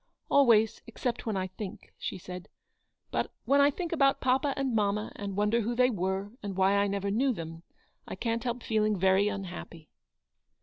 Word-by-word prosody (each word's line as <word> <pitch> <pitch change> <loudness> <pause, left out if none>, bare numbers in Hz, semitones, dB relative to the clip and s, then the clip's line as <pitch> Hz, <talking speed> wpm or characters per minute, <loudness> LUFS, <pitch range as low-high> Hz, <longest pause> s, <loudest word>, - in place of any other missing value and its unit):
"Always, 230 -6 +5
except 235 +1 -3
when 215 -3 0
I 185 - 0
think," 185 +2 -8
she - - -4
said; 180 0 -8 0.3
" - - -48
but - - -1
when 280 +1 +4
I 285 - +6
think 340 +4 -4
about 275 -5 +3
papa 265 +2 +1
and 270 -3 0
mamma, 210 0 0
and 200 -1 -5
wonder 210 +3 +2
who 235 +3 -2
they 250 +1 +4
were, 190 0 -2
and 200 -2 -5
why 190 +1 +4
I 200 0 +3
never 200 0 -1
knew 260 +6 +2
them, 165 -3 -7 0.5
I - - -5
can't 230 -1 -2
help 245 -1 -3
feeling 215 -2 +1
very 190 +2 +4
unhappy." 180 -5 -6
210 Hz, 185 wpm, -29 LUFS, 195-245 Hz, 0.5 s, I